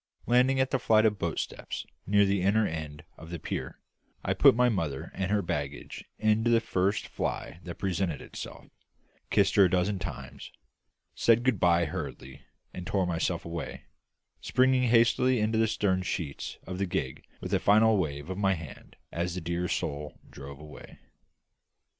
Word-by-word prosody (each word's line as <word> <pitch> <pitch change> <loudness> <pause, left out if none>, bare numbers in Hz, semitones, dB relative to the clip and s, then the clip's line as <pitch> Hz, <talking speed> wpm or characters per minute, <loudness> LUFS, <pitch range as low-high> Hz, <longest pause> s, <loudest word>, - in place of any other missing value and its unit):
Landing 125 +2 +3
at 130 0 +1
the 135 - +1
flight 110 -2 +4
of 105 -2 +2
boat 85 -3 -2
steps - - -5 0.2
near 100 +1 +5
the 100 -1 +1
inner 105 +4 +3
end 80 -3 -5 0.2
of 80 - -11
the 85 - -4
pier, - - -5 0.5
I - - +1
put - - +6
my 125 +1 +4
mother 80 - -2
and 95 -1 -2
her 105 -1 +1
baggage 70 -4 -4
into 110 +2 +2
the 115 -1 +5
first 100 -2 0
fly 80 - -4
that 85 - -6
presented 90 -6 -1
itself; - - -9 0.6
kissed 100 -2 +3
her 100 - +8
a - - +2
dozen 95 +2 +1
times; 70 -6 -7 0.6
said 115 +1 +3
good 125 -7 +2
bye 85 -1 +4
hurriedly, 65 -3 -6 0.3
and 90 0 -7
tore 95 -2 +1
myself 85 -2 -1
away; 85 -2 -6 0.6
springing 130 -1 +3
hastily 120 +2 +4
into 110 +1 +1
the 110 - +3
stern 100 -3 +1
sheets 85 -6 -4
of 90 0 -6
the 100 - 0
gig 65 -6 -3 0.2
with - - -5
a - - +3
final 110 +2 +5
wave 75 -3 -3
of 95 +2 -4
the 95 -1 +3
hand 80 -5 -11 0.2
as 85 +1 -2
the - - -2
dear 85 +2 -2
soul 75 -2 -3
drove 70 0 -9
away. 75 0 -12
95 Hz, 170 wpm, -29 LUFS, 80-110 Hz, 0.6 s, her